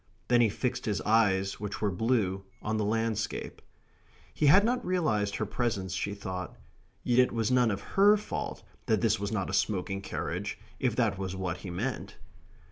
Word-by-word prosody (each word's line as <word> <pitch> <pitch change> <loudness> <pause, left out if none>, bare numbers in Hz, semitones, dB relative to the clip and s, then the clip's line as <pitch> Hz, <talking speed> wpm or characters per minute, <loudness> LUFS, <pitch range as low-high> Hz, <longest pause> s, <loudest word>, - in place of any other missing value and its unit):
then 120 -1 +5
he 115 - +4
fixed 120 +4 -2
his 105 -2 0
eyes 100 -3 +2
which 105 -1 -4
were 105 -2 +1
blue 95 -2 0 0.2
on 110 +1 -1
the 110 - 0
landscape. 110 0 -2 0.7
He 150 - +2
had 190 +8 +7
not 245 +2 0
realized 110 - 0
her 110 - -1
presence, 100 -4 -2
she 100 +1 -2
thought. 95 -2 -6 0.5
Yet 125 0 +3
it 125 - +5
was 115 0 0
none 125 -2 +4
of 100 - -2
HER 205 +2 +4
fault 210 - -5 0.2
that - - +2
this - - +2
was 100 +1 -3
not 100 -4 -1
a - - -6
smoking 95 0 0
carriage 95 - -4 0.2
if - - +1
that 100 - +1
was 95 -1 -3
what 90 -2 -3
he 95 - -8
meant. 110 +10 -4
105 Hz, 185 wpm, -29 LUFS, 95-120 Hz, 0.7 s, had